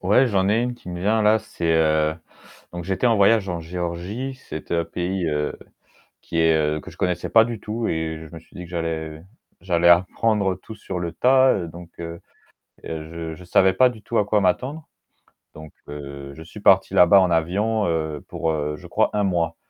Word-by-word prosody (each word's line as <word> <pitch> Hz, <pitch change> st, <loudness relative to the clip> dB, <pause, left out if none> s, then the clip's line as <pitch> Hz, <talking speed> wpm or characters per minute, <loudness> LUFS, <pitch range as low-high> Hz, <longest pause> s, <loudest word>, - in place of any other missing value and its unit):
Ouais, 105 Hz, +8 st, +4 dB
j'en 95 Hz, -4 st, +1 dB
ai 110 Hz, +3 st, +2 dB
une 125 Hz, 0 st, -2 dB
qui 105 Hz, -, -14 dB
me 90 Hz, 0 st, -5 dB
vient 110 Hz, +4 st, +2 dB
là, 105 Hz, +1 st, +4 dB
c'est 85 Hz, -, -8 dB
heu, 80 Hz, -1 st, +2 dB, 0.6 s
donc 85 Hz, 0 st, -5 dB
j'étais 95 Hz, +6 st, 0 dB
en 115 Hz, -, +4 dB
voyage 100 Hz, 0 st, +4 dB
en 85 Hz, -2 st, -3 dB
Géorgie. 90 Hz, +9 st, -4 dB
C'est 85 Hz, -12 st, -8 dB
un 85 Hz, -1 st, +1 dB
pays, 90 Hz, +1 st, -3 dB
heu, 75 Hz, -1 st, -2 dB, 0.7 s
qui 85 Hz, -, -3 dB
est 80 Hz, -2 st, +2 dB
que -, -, -11 dB
je -, -, -16 dB
connaissais 90 Hz, -1 st, -1 dB
pas 115 Hz, -1 st, +6 dB
du 115 Hz, -3 st, -5 dB
tout 110 Hz, +3 st, -3 dB
et 80 Hz, 0 st, -3 dB
je 75 Hz, -, -17 dB
me -, -, -8 dB
suis 80 Hz, -, -24 dB
dit 90 Hz, -, -7 dB
que 85 Hz, -, -11 dB
j'allais 80 Hz, -2 st, -4 dB, 0.4 s
j'allais 85 Hz, -1 st, +2 dB
apprendre 95 Hz, +2 st, +3 dB
tout 95 Hz, +5 st, -11 dB
sur 95 Hz, -3 st, -6 dB
le 85 Hz, -1 st, -3 dB
tas, 130 Hz, +4 st, +4 dB
donc 85 Hz, +1 st, -11 dB
heu, 85 Hz, 0 st, -6 dB, 0.7 s
je 80 Hz, 0 st, -6 dB
je 90 Hz, +3 st, -13 dB
savais 95 Hz, +1 st, +3 dB
pas 125 Hz, +4 st, +5 dB
du 110 Hz, -, -11 dB
tout 115 Hz, -, -4 dB
à 105 Hz, -, +3 dB
quoi 105 Hz, 0 st, +1 dB
m'attendre. 130 Hz, -, -1 dB, 0.7 s
Donc 75 Hz, 0 st, -11 dB, 0.2 s
heu, 70 Hz, -1 st, -8 dB
je 80 Hz, -, -10 dB
suis 85 Hz, +6 st, -11 dB
parti 95 Hz, -1 st, +4 dB
là-bas 95 Hz, +1 st, +7 dB
en 90 Hz, -1 st, +2 dB
avion 100 Hz, +7 st, +1 dB, 0.4 s
pour, 80 Hz, -, -2 dB
heu, 75 Hz, -1 st, -2 dB
je -, -, -13 dB
crois -, -, +1 dB
1 105 Hz, -1 st, +1 dB
mois. 85 Hz, -3 st, 0 dB
90 Hz, 200 wpm, -23 LUFS, 80-105 Hz, 0.7 s, là-bas